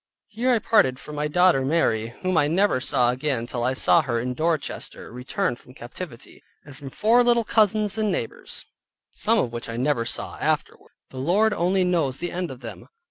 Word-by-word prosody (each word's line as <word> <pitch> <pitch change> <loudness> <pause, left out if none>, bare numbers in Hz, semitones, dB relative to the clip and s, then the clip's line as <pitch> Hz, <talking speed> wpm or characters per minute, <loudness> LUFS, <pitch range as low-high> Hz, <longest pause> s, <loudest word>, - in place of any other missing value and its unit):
Here 235 +4 -1
I 245 - +4
parted 210 - +3
from 150 - -10
my 150 0 -1
daughter 180 -3 +3
Mary 130 -7 +1 0.2
(whom 185 0 0
I 145 -2 +3
never 175 -4 +2
saw 125 -3 +2
again 130 -2 -2
till 120 0 -4
I 130 +2 0
saw 170 +5 +4
her 120 -5 -2
in 125 +2 -3
Dorchester, 155 0 -3
returned 125 - -2
from 125 - -17
captivity), 120 +1 -10 0.2
and 145 -2 -12
from 140 0 -9
four 225 - +3
little 240 -1 +3
cousins 215 -1 +2
and 215 -2 +1
neighbors, 120 -10 -5 0.5
some - - +1
of 120 - 0
which 120 0 -6
I 115 - -5
never 130 -2 0
saw - - -4
afterward: - - -2 0.2
the 130 - -8
Lord 205 +10 +2
only 185 +1 +1
knows 165 -7 0
the 175 - -4
end 180 -1 -3
of 130 -1 -10
them. 115 -4 -9
150 Hz, 195 wpm, -24 LUFS, 125-185 Hz, 0.5 s, I